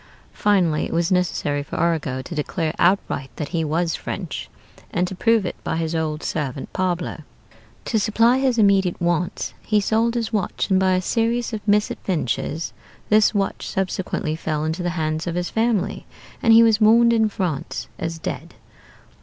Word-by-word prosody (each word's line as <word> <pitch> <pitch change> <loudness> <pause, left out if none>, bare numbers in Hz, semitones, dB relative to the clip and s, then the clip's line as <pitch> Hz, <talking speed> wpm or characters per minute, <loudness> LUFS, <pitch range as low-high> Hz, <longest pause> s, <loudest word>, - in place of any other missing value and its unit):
Finally 180 -7 +2
it - - -6
was 170 +1 +1
necessary 170 -5 0
for 140 - -7
Arago 145 -6 0
to 150 - -7
declare 155 +1 -2
outright 175 -6 +1
that 150 - -4
he 165 -2 -1
was 165 +2 0
French, - - -5 0.4
and 180 +1 0
to 190 - -6
prove 225 +2 +2
it 175 - -3
by - - -2
his 165 0 -2
old 155 -1 -2
servant 140 -3 -3
Pablo. 175 -3 -2 0.6
To 220 - +1
supply 230 +4 +3
his 260 -3 +1
immediate 195 -4 +3
wants 175 0 -1
he 215 -2 +2
sold 225 +3 +1
his 230 -1 -2
watch; 205 -1 -1
and 190 - +5
by 190 0 +3
a 185 - +2
series 235 +3 0
of 215 - -3
misadventures 175 - 0 0.4
this 215 +1 +4
watch 195 -1 -1
subsequently 185 -4 -2
fell 155 -1 -2
into 160 +3 -2
the 175 - -1
hands 155 +1 -1
of 170 - -2
his 175 0 -2
family, 225 -3 0 0.3
and 230 - +4
he 225 +1 +8
was 220 -1 +3
mourned 235 +2 +6
in 220 -1 +3
France 180 -9 -3
as 165 0 -3
dead. - - -6
180 Hz, 170 wpm, -22 LUFS, 160-215 Hz, 0.6 s, he